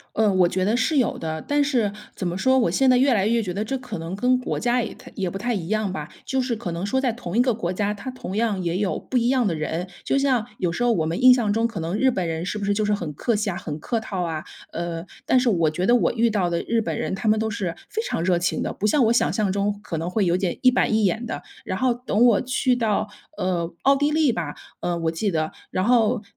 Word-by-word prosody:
呃， 215 -2 +3
我 180 -2 +4
觉 185 +1 -1
得 215 +4 +2
是 295 +3 +1
有 250 - +1
的， 160 -1 -4
但 290 0 +1
是 240 -8 +1 0.2
怎 185 - -4
么 175 +1 -2
说， 260 +5 +3
我 245 -3 +3
现 270 - +2
在 255 - +6
越 265 +1 +4
来 200 -3 +2
越 230 +1 +2
觉 185 -4 -3
得 200 +4 -2
这 270 +5 -2
可 255 -9 -6
能 165 +3 -5
跟 250 +5 +2
国 255 - -3
家 245 +1 +2
也 230 - -4
太 - - -14
也 190 -3 -1
不 185 - -6
太 240 +5 -1
一 190 -7 -3
样 215 -2 0
吧， 195 - -5 0.2
就 265 - 0
是 250 -2 -1
可 220 -6 -5
能 170 +4 -3
说 265 +5 +1
在 255 -3 +1
同 215 -4 -6
一 245 - +6
个 250 -1 +2
国 185 -5 -2
家， 205 +2 -1
它 210 +5 -6
同 200 -6 -6
样 215 -5 0
也 170 0 -1
有 195 -1 0
不 260 - -4
一 235 0 +1
样 260 -2 +2
的 180 -6 0
人。 160 +4 -3 0.2
就 - - +1
像 260 -5 +2
有 175 -2 0
时 245 +8 -1
候 240 - +4
我 165 -8 +1
们 165 +2 -2
印 255 0 +8
象 225 -5 +1
中 225 +2 +2
可 230 -7 -5
能 165 +5 -2
日 260 +2 +3
本 180 -5 -2
人 165 +2 -3
是 - - -3
不 205 - -4
是 205 - +1
就 210 +1 0
是 210 - +2
很 170 -7 -4
客 230 - 0
气 210 -1 0
啊， 175 - -4
很 150 -4 -5
客 230 +9 -1
套 195 -4 -4
啊， 160 -2 -3 0.3
呃 170 0 -4 0.2
但 260 - +4
是 250 - +1
我 170 -7 +3
觉 165 +4 -2
得 240 +4 +5
我 - - +2
遇 235 0 +2
到 195 -5 +1
的 170 0 -1
日 230 0 0
本 220 - -3
人 - - -2
他 220 - -5
们 215 0 +3
都 220 0 -1
是 185 -5 -3
非 440 - -2
常 165 - -2
热 180 -1 +2
情 175 - -1
的， - - -2
不 210 - -2
像 260 +4 +3
我 225 - +4
想 235 - +2
象 210 -4 0
中 200 +1 -1
可 165 - -4
能 165 +2 -3
会 200 +2 +1
有 175 0 +2
点 185 -2 -1
一 255 - +7
板 240 -3 +1
一 220 -1 +3
眼 225 +5 0
的， - - -5 0.2
然 - - -3
后 260 -1 +2
等 240 -1 +1
我 235 -4 +5
去 255 0 +1
到， 220 -3 0 0.3
呃 175 -2 -1
奥 275 +1 +5
地 290 +2 +1
利 310 -3 +3
吧， 165 -9 -3 0.3
呃 175 -1 -1
我 165 -1 0
记 190 +4 -1
得， 155 -1 0 0.2
然 185 - 0
后 235 -1 +3
210 Hz, 315 characters per minute, -23 LUFS, 180-245 Hz, 0.3 s, 印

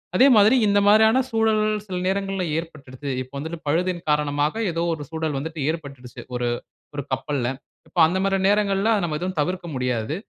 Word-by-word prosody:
அதே 260 +9 +6
மாதிரி, 215 +5 +6
இந்த 205 0 +4
மாதிரியான 220 +4 +5
சூழல் 225 -1 +2 0.2
சில 185 -2 -6
நேரங்கள்ல 195 -1 -1
ஏற்பட்டுடுது. 145 -4 -7
இப்போ 130 +2 -10
வந்துட்டு 160 +3 -5
பழுதின் 175 +3 0
காரணமாக 150 +2 +1 0.2
ஏதோ 165 +1 -2
ஒரு 150 -2 -6
சூழல் 160 -3 -2
வந்துட்டு 160 +1 -6
ஏற்பட்டுச்சி 140 -6 -7
ஒரு 120 0 -1 0.5
ஒரு 140 - -3
கப்பல்ல. 130 -2 -1 0.4
இப்போ 170 +2 -4
அந்த 185 +3 -1
மாதிரி 195 0 +1
நேரங்கள்ல, 205 0 +2
அத 205 - 0
நம்ம 155 -2 -2
எதுவும் 185 -2 -3
தவிர்க்க 180 +2 -3
முடியாது. 125 +1 -1
165 Hz, 170 wpm, -23 LUFS, 145-195 Hz, 0.5 s, அதே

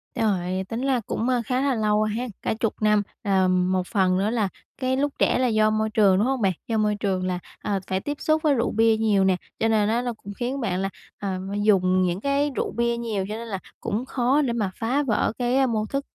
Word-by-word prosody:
Trời, 190 -4 0
tính 230 +2 -3
la 265 -2 +1
cũng, 240 +3 -1
a, 245 -2 +2
khá 255 +2 0
là 275 -3 +1
lâu 215 -1 +2
ha, 220 +4 -2 0.2
cả - - 0
10 225 - 0
năm. 210 -1 +4 0.2
Ờm, 185 -2 +2
một 185 -1 0
phần 190 -4 +2
nữa 200 +3 +1
là 220 -4 0 0.3
cái 260 0 0
lúc 285 0 0
trẻ - - +3
là 255 - +2
do 215 -1 +3
môi 215 0 0
trường, 200 -4 +4
đúng 210 - +2
hông 265 -3 0
bạn? 190 -2 +2
Do 225 -1 0
môi 210 -1 +2
trường 190 -3 -1
là, 180 -1 -1 0.2
à, 200 -2 -1
phải 190 0 0
tiếp 290 +7 -4
xúc 310 0 +1
với 300 -2 +4
rượu 235 -2 0
bia 225 0 +3
nhiều 210 -3 +2
nè, 190 -1 +3 0.2
cho 225 - +2
nên 215 -1 +2
á 235 +2 +1
nó 245 -1 -2
cũng 205 -2 -10
khiến 255 +3 -2
bạn 185 -4 -1
là, 195 - -1 0.3
à, 190 -2 -3 0.2
dùng 185 -3 +3
những 180 +2 0
cái 280 +1 +1
rượu - - -1
bia 235 0 0
nhiều, 215 -5 -2
cho 215 - -3
nên 230 +1 -6
là 195 -3 -4 0.2
cũng 230 +5 -2
khó 260 +3 +1
để 245 -4 0
mà 210 -5 -1
phá 255 +6 +1
vỡ 225 -5 +1
cái, 245 +1 +1
a, 270 - +4
mô 215 -2 0
thức, 275 +4 -3
220 Hz, 250 wpm, -24 LUFS, 195-245 Hz, 0.3 s, năm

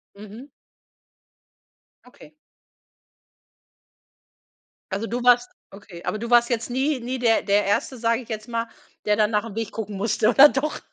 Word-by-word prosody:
Mhm. 215 +6 -12 1.6
Okay 285 +4 -18 2.6
Also, 200 +4 -3
du 240 +2 -3
machst 245 0 +4 0.2
Okay, 195 -3 -13
aber 215 - -3
du 235 +1 -6
warst 240 0 +4
jetzt 235 -1 -2
nie 265 +2 -1
nie 255 +2 -4
der 230 -2 +2
der 205 0 +1
1., 205 +6 -1
sage 230 +1 0
ich 240 - -16
jetzt 215 0 -6
mal, 230 -1 -3 0.4
der 210 0 +2
dann 215 +1 +2
nach 210 0 +1
dem 220 -3 -9
Weg 225 -2 -4
gucken 210 -3 -6
musste, 215 +1 +1
oder 270 +5 +8
doch? 295 +2 -3
230 Hz, 155 wpm, -23 LUFS, 210-245 Hz, 2.6 s, oder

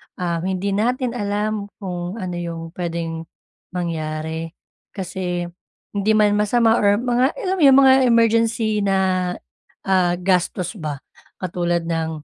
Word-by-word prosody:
um, 170 -2 -2
hindi 190 +1 -1
natin 245 +4 0
alam 210 -1 -2
kung 180 -1 -4
ano 185 -5 -4
'yong 165 -1 -5
puwedeng 165 -2 -4 0.5
mangyari. 160 -1 -3 0.4
Kasi 180 -2 -3 0.5
hindi 205 +1 +1
man 210 -1 +4
masama 225 +2 +3
or 205 0 +4
mga 245 +4 +1
alam 380 -1 0
mo - - -1
'yong 270 0 +8
mga 265 0 +7
emergency 230 -1 +2
na, 190 -2 +1 0.5
ah, 185 -2 +2
gastos 180 +2 0
ba 150 -4 -5 0.4
katulad 175 -1 -1
ng 160 -2 -3
185 Hz, 130 wpm, -21 LUFS, 170-215 Hz, 0.5 s, yong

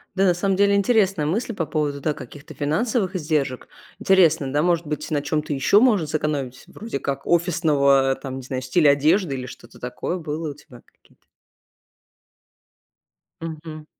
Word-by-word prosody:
Да, 195 - +2
на 180 - +4
самом 190 +2 0
деле 200 +1 +3
интересная 200 -6 +2
мысль 215 +9 -1
по 165 - -2
поводу, 150 -1 -2
да, 150 +1 -1
каких-то 145 +2 -11
финансовых 190 - -1
издержек. 150 -5 -2 0.3
Интересно, 160 -8 +3
да, 145 - +2
может 170 -1 +1
быть, 150 +1 -4
на 145 -2 +1
чём-то 150 0 -2
ещё 145 - +4
можно 210 -11 +3
сэкономить, 145 -4 -3
вроде 220 -10 -6
как 140 -1 -4
офисного, 150 -6 +3
там, 135 0 -7
не - - -6
знаю, 130 0 -4
стиля 140 +3 +4
одежды 150 +3 +2
или 125 -1 -5
что-то - - -13
такое. 125 +7 -4
Было 155 -1 -4
у - - -8
тебя 140 -4 -16
какие-то? - - -30 2.2
Мгм. 155 -1 -7
155 Hz, 160 wpm, -22 LUFS, 140-180 Hz, 2.2 s, на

